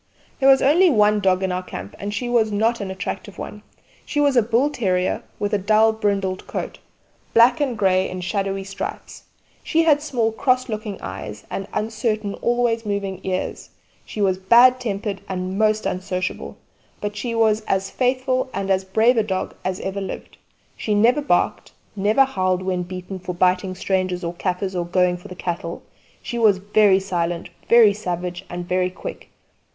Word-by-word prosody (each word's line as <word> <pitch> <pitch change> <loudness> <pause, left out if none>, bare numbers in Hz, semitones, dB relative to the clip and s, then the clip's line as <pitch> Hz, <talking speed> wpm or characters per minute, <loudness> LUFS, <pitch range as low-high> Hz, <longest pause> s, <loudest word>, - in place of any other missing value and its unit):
There 270 -1 +5
was 270 -1 +6
only 335 +7 +5
the 285 - +1
one 210 0 +4
dog 190 -1 +2
in 190 - 0
our 180 0 -1
camp; 100 - -8
and 200 +1 -4
she 240 +4 -3
was 230 -3 +2
not 225 +2 +1
an 195 - -4
attractive 190 0 -5
one. - - -7 0.4
She 295 - -3
was 285 -2 +3
a 240 - +6
bull 240 +6 +1
terrier 185 -9 0 0.2
with 205 +1 -2
a 205 - +2
dull 215 +3 +4
brindled 200 -3 -1
coat - - -5 0.6
black 240 +6 +6
and 260 -5 0
grey 190 -2 +2
in 185 0 -5
shadowy 195 +1 -2
stripes. 195 0 -7 0.4
She 330 0 +2
had 300 -3 +4
small 240 -7 0
cross 255 +3 +1
looking 215 -2 -4
eyes - - -7
and 195 - -4
uncertain 215 -1 -2
always 240 -1 0
moving 200 -3 -3
ears; 185 -1 -3 0.3
she 210 - -6
was 190 -2 +2
bad 240 +6 +6
tempered 205 -4 -3
and 185 +1 -3
most 215 0 +2
unsociable; 185 0 -3 0.4
but 205 0 -4
she 230 +2 -3
was 220 -1 +3
as 195 0 0
faithful 255 0 0
and 195 0 -1
as 190 0 +2
brave 220 +6 +3
a 220 - +4
dog 190 -3 -3
as 185 0 -2
ever 195 +1 -3
lived. 195 - -7 0.4
She 210 - -1
never 240 +7 +4
barked; 290 - 0 0.2
never 215 +7 +3
howled 185 -7 -1
when 185 -1 -1
beaten 185 +1 -7
for 180 0 -5
biting 185 +1 +1
strangers 185 -1 -1
or 170 0 -3
kaffirs 185 +2 -2
or 175 - 0
going 180 0 +2
for 175 - -12
the 180 - -9
cattle; 170 -1 -4 0.4
she 240 -2 -4
was 215 -4 +5
very 205 0 +4
silent, 175 -2 -3 0.2
very 230 -3 +7
savage, 180 -2 -4
and 175 0 -6
very 180 0 +1
quick. 485 - -8
200 Hz, 180 wpm, -22 LUFS, 185-230 Hz, 0.6 s, very